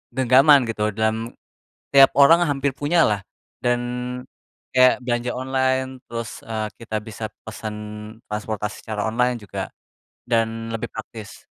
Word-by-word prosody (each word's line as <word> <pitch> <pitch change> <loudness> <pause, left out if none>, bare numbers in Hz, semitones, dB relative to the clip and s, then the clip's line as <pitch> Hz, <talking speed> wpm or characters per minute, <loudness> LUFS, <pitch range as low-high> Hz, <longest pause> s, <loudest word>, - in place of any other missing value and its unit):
genggaman 130 +2 +6
gitu 110 -3 -2
dalam, 110 +1 -1 0.6
tiap 135 -1 +9
orang 165 +5 +7
hampir 140 -3 0
punyalah, 145 - +2 0.4
dan, 120 0 +2 0.9
kayak 130 0 +6
belanja 120 0 -1
online 130 0 0 0.2
terus, 115 -1 -6
eee, 110 -1 -2
kita 110 -2 -5
bisa 110 0 -7 0.2
pesen 110 -1 -6 0.5
transportasi 105 0 -4
secara 110 -2 -4
online 125 +2 +1
juga 105 -3 -6 0.6
dan 115 -1 0
lebih 110 - -4
praktis. 110 -3 -9
115 Hz, 120 wpm, -22 LUFS, 110-130 Hz, 0.9 s, tiap